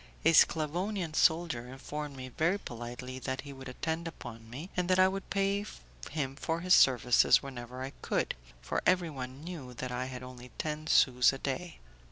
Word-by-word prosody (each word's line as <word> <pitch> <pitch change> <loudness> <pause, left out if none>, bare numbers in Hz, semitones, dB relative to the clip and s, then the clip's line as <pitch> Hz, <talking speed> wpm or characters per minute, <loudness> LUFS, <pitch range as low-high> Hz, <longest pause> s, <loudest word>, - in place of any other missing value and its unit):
A 165 - +6
Sclavonian 170 +3 +2
soldier 160 -8 +2
informed 145 +2 -6
me 130 0 -7
very 165 +9 +1
politely 125 - -7
that 130 0 -3
he 140 -1 -9
would 135 -1 -9
attend 160 +6 -3
upon 115 -8 -9
me, 145 +10 -8
and 180 0 0
that 185 - +4
I 185 0 +7
would 195 +1 -4
pay 200 +1 +1 0.5
him 135 -3 -2
for 165 +3 -2
his 180 +1 +4
services 125 -3 +6
whenever 125 -1 -7
I 135 - -5
could, - - 0 0.3
for - - -1
everyone 145 -7 0
knew 150 -8 -7
that 130 +1 -4
I 125 +1 -2
had 130 -1 -7
only 125 -1 -10
ten 155 0 -3
sous 125 -4 +5
a - - -4
day. 145 +6 -4
140 Hz, 180 wpm, -31 LUFS, 125-170 Hz, 0.5 s, I